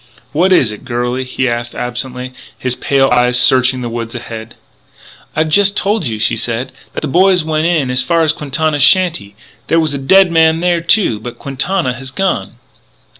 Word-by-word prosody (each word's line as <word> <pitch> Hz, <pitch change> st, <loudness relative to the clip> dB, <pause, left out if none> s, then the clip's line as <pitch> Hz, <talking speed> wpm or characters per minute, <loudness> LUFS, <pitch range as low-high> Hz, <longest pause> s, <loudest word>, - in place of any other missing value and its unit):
"What 180 Hz, +5 st, +1 dB
is 135 Hz, -11 st, +3 dB
it, 105 Hz, -, -10 dB
girlie?" 125 Hz, 0 st, -2 dB
he 130 Hz, 0 st, -2 dB
asked 120 Hz, 0 st, -3 dB
absently, 125 Hz, +1 st, -5 dB, 0.2 s
his 130 Hz, -1 st, -1 dB
pale 135 Hz, 0 st, +1 dB
eyes 125 Hz, 0 st, +3 dB
searching 130 Hz, 0 st, +3 dB
the 120 Hz, -, -4 dB
woods 115 Hz, 0 st, -6 dB
ahead. 115 Hz, -1 st, -8 dB, 0.8 s
"I've 155 Hz, 0 st, 0 dB
just 200 Hz, +5 st, +3 dB
told 205 Hz, -, 0 dB
you," 110 Hz, -2 st, -3 dB
she 110 Hz, +1 st, 0 dB
said, 115 Hz, +2 st, -2 dB, 0.2 s
"that -, -, -3 dB
the 155 Hz, -, -3 dB
boys 180 Hz, +3 st, +3 dB
went 155 Hz, +1 st, -1 dB
in 155 Hz, -7 st, 0 dB
as 125 Hz, 0 st, +2 dB
far 165 Hz, +3 st, +1 dB
as 160 Hz, 0 st, +2 dB
Quintana's 150 Hz, 0 st, -2 dB
shanty. 150 Hz, -, +2 dB, 0.3 s
There 165 Hz, -, +2 dB
was 155 Hz, -3 st, 0 dB
a 140 Hz, -, -3 dB
dead 190 Hz, +6 st, +4 dB
man 160 Hz, -1 st, +3 dB
there, 175 Hz, -1 st, 0 dB
too; 170 Hz, -, +2 dB
but 120 Hz, +2 st, -8 dB
Quintana 140 Hz, +3 st, -1 dB
has 130 Hz, +2 st, -7 dB
gone." 150 Hz, -, -2 dB
135 Hz, 185 wpm, -14 LUFS, 120-165 Hz, 0.8 s, dead